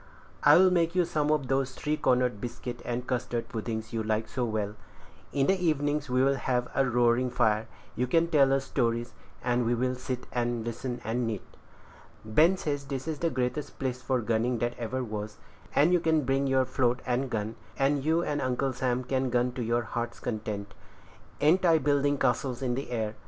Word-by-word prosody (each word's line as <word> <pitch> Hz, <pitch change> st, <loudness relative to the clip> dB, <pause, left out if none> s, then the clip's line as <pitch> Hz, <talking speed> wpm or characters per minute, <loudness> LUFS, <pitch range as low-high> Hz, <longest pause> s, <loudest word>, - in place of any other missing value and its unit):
I'll 185 Hz, +1 st, +7 dB
make 170 Hz, -1 st, +2 dB
you 180 Hz, -1 st, +3 dB
some 150 Hz, -3 st, 0 dB
of 150 Hz, -4 st, +1 dB
those 135 Hz, 0 st, 0 dB
three 150 Hz, +1 st, -1 dB
cornered 125 Hz, -6 st, +1 dB
biscuit 120 Hz, 0 st, -6 dB
and 120 Hz, +1 st, -3 dB
custard 120 Hz, -2 st, -2 dB
puddings 110 Hz, -1 st, -4 dB
you 115 Hz, -, 0 dB
like 110 Hz, 0 st, -1 dB
so 125 Hz, -, -3 dB
well. 105 Hz, -2 st, -2 dB, 0.6 s
In 140 Hz, -1 st, +1 dB
the 190 Hz, +3 st, +1 dB
evenings 150 Hz, -2 st, 0 dB
we'll 130 Hz, +2 st, +3 dB
have 125 Hz, -1 st, 0 dB
a 135 Hz, -, +3 dB
roaring 120 Hz, +1 st, +3 dB
fire; 110 Hz, -2 st, +1 dB, 0.3 s
you 125 Hz, -, 0 dB
can 165 Hz, +6 st, +3 dB
tell 135 Hz, -4 st, +4 dB
stories, 120 Hz, -3 st, -1 dB, 0.3 s
and 120 Hz, 0 st, +1 dB
we 120 Hz, +1 st, +1 dB
will 125 Hz, +2 st, 0 dB
sit 125 Hz, 0 st, -5 dB
and 120 Hz, -2 st, -1 dB
listen, 120 Hz, +1 st, -4 dB
and 115 Hz, +2 st, -1 dB
knit. 110 Hz, -4 st, -3 dB, 0.8 s
Ben 155 Hz, -, +4 dB
says 145 Hz, -5 st, -3 dB
this 135 Hz, 0 st, -5 dB
is 155 Hz, -2 st, -3 dB
the 170 Hz, -, +1 dB
greatest 130 Hz, +2 st, -2 dB
place 130 Hz, -2 st, -3 dB
for 130 Hz, -1 st, 0 dB
gunning 115 Hz, +2 st, 0 dB
that 120 Hz, +1 st, -1 dB
ever 125 Hz, +3 st, -2 dB
was; 105 Hz, -2 st, -5 dB, 0.4 s
and 155 Hz, +5 st, +5 dB
you 180 Hz, -, +5 dB
can 160 Hz, -2 st, +2 dB
bring 135 Hz, +1 st, +1 dB
on -, -, 0 dB
your 130 Hz, -1 st, +3 dB
float 125 Hz, -1 st, 0 dB
and 130 Hz, +1 st, 0 dB
gun, 110 Hz, -1 st, -3 dB, 0.2 s
and 140 Hz, 0 st, +2 dB
you 160 Hz, +3 st, +2 dB
and 145 Hz, -3 st, -1 dB
Uncle 130 Hz, +1 st, 0 dB
Sam 125 Hz, 0 st, -1 dB
can 130 Hz, 0 st, 0 dB
gun 125 Hz, +1 st, +1 dB
to 125 Hz, -, -5 dB
your 120 Hz, +1 st, +1 dB
heart's 120 Hz, +2 st, -4 dB
content. 105 Hz, -3 st, -4 dB, 0.7 s
Ain't 170 Hz, +6 st, +4 dB
I 165 Hz, -2 st, +5 dB
building 145 Hz, 0 st, +2 dB
castles 130 Hz, 0 st, 0 dB
in 125 Hz, -2 st, 0 dB
the 135 Hz, +3 st, -4 dB
air?" 110 Hz, -3 st, -2 dB
125 Hz, 195 wpm, -28 LUFS, 120-140 Hz, 0.8 s, I'll